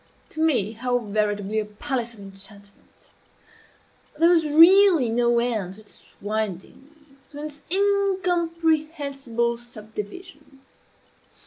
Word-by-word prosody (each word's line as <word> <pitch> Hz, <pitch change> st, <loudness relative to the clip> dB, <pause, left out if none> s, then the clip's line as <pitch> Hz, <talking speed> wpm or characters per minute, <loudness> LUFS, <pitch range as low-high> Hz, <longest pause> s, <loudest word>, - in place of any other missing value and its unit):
to 315 Hz, -, -8 dB
me 250 Hz, -11 st, +2 dB
how 245 Hz, +2 st, -1 dB
veritably 210 Hz, -1 st, -1 dB
a 215 Hz, -, -2 dB
palace 235 Hz, +2 st, -4 dB
of -, -, -17 dB
enchantment! 200 Hz, +1 st, -14 dB, 1.1 s
There 330 Hz, +2 st, +4 dB
was 335 Hz, -2 st, +4 dB
really 330 Hz, -, +6 dB
no 235 Hz, +1 st, +2 dB
end 220 Hz, -6 st, -1 dB
to 215 Hz, -, -15 dB
its 210 Hz, -, -19 dB, 0.2 s
windings 215 Hz, +4 st, -5 dB, 0.4 s
to 290 Hz, -, -12 dB
its 295 Hz, -1 st, -8 dB
incomprehensible 330 Hz, -, 0 dB
subdivisions. 240 Hz, -, -10 dB
245 Hz, 105 wpm, -24 LUFS, 215-320 Hz, 1.1 s, really